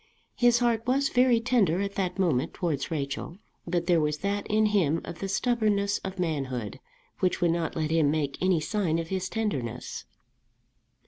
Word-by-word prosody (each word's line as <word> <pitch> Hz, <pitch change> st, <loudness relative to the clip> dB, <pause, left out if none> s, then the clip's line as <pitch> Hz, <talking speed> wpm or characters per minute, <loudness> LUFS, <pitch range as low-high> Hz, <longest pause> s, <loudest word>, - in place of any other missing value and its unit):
His 240 Hz, -1 st, +4 dB
heart 235 Hz, -1 st, +1 dB
was 275 Hz, +2 st, +2 dB
very 245 Hz, -1 st, +4 dB
tender 225 Hz, -8 st, +2 dB
at 200 Hz, 0 st, -2 dB
that 190 Hz, -2 st, -2 dB
moment 165 Hz, -10 st, 0 dB
towards 155 Hz, -6 st, -2 dB
Rachel, 145 Hz, +2 st, -4 dB, 0.3 s
but 170 Hz, 0 st, 0 dB
there 170 Hz, -2 st, +3 dB
was 150 Hz, 0 st, 0 dB
that 200 Hz, +1 st, -1 dB
in 215 Hz, 0 st, +3 dB
him 180 Hz, -7 st, +2 dB
of 170 Hz, -, -8 dB
the 195 Hz, -, -3 dB
stubbornness 205 Hz, -2 st, +1 dB
of 190 Hz, 0 st, -6 dB
manhood 135 Hz, -, -3 dB, 0.4 s
which 185 Hz, -2 st, +1 dB
would 175 Hz, -2 st, +3 dB
not 165 Hz, -1 st, -2 dB
let 155 Hz, -1 st, -1 dB
him 160 Hz, -3 st, +3 dB
make 145 Hz, -2 st, -1 dB
any 185 Hz, -2 st, +3 dB
sign 170 Hz, -2 st, 0 dB
of 165 Hz, 0 st, -4 dB
his 190 Hz, -1 st, -2 dB
tenderness. 135 Hz, -, -3 dB
180 Hz, 175 wpm, -27 LUFS, 155-210 Hz, 0.4 s, His